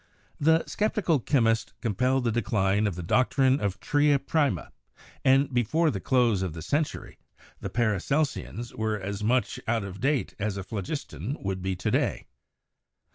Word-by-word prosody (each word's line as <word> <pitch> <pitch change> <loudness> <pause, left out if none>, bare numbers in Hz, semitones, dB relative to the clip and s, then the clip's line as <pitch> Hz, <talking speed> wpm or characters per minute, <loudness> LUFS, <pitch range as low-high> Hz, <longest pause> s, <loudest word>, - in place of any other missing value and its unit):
The 160 +2 +4
'Sceptical 205 -7 0
Chymist' 115 -3 +1
compelled 125 +4 +1
the 115 - +1
decline 105 -2 +1
of 100 - -2
the 90 - -5
doctrine 130 - +3
of 100 -2 0
the - - -33
'tria 145 -1 +4
prima,' 140 - 0 0.5
and 135 +1 +4
before 155 +7 +2
the - - -3
close 120 -7 +2
of 95 -4 -2
the 80 -1 -7
century 150 +1 -2 0.4
the - - -5
Paracelsians 120 - -1
were 110 -1 -1
as 100 +2 -4
much 125 +4 +1
out 115 -2 +1
of 100 0 -7
date 135 0 0
as 105 -1 -2
a 95 - -4
Phlogistian 105 - -5
would 95 -1 -2
be 95 0 -1
to 90 - -2
day. - - 0
120 Hz, 160 wpm, -27 LUFS, 100-140 Hz, 0.5 s, The